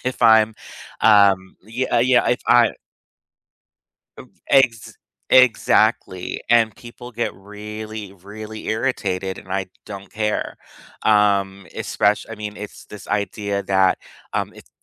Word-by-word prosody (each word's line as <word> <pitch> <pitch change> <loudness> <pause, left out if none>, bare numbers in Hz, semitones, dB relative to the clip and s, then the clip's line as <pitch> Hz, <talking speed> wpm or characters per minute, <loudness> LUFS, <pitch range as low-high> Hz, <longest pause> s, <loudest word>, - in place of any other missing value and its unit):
if 130 0 -3
I'm, 110 -1 +5 0.5
um, 100 -3 +4
yeah, 125 +4 -3
uh, - - +5
yeah, 125 +1 +3
if 125 - 0
I 120 -2 +5 1.5
Of - - -12 0.2
ex 125 -5 +2 0.3
exactly, 110 -6 +3
and 115 -2 +3
people 120 +1 -11
get 120 -1 -3
really, 105 +1 -8
really 105 +3 -10
irritated, 100 -6 -2
and 95 - -10
I 95 -1 -1 0.2
don't 100 -1 -9
care. 105 -1 -2 0.5
Um, 100 -2 +2
espec 105 0 0
I 115 - -7
mean, 105 0 -7
it's 105 0 -9
this 105 - -12
idea 100 -1 -2
that, 95 -1 +2 0.3
um, - - -2
it - - -16
105 Hz, 125 wpm, -21 LUFS, 100-115 Hz, 1.5 s, I'm